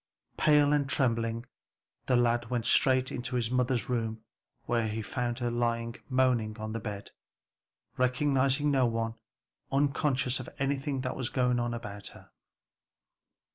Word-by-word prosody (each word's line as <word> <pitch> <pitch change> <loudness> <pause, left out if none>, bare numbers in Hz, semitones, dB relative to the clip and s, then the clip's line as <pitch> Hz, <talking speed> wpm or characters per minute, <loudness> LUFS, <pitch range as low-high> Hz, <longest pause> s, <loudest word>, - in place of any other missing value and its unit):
Pale 150 -1 +4
and 140 -2 +1
trembling 115 -3 +1 0.6
the 125 - +3
lad 120 -1 +2
went 120 -2 -1
straight 130 -1 +3
to 125 0 -3
his 120 -1 0
mother's 125 -1 +1
room 115 -3 -2 0.4
where 115 -2 +1
he 110 +1 -3
found 120 +4 -2
her 120 -2 -1
lying 115 0 -1
moaning 125 -4 +1
on 110 0 -5
the 115 - -3
bed, 105 -2 -6 0.9
recognizing 135 +2 +2
no 130 -3 +3
one, 115 -1 -1 0.6
unconscious 140 -2 +1
of 130 - -7
anything 135 0 -1
that 125 - -3
was 130 -2 -2
going 125 -1 +1
on 120 0 -1
about 105 -3 -7
her. - - -14
125 Hz, 140 wpm, -30 LUFS, 115-130 Hz, 0.9 s, Pale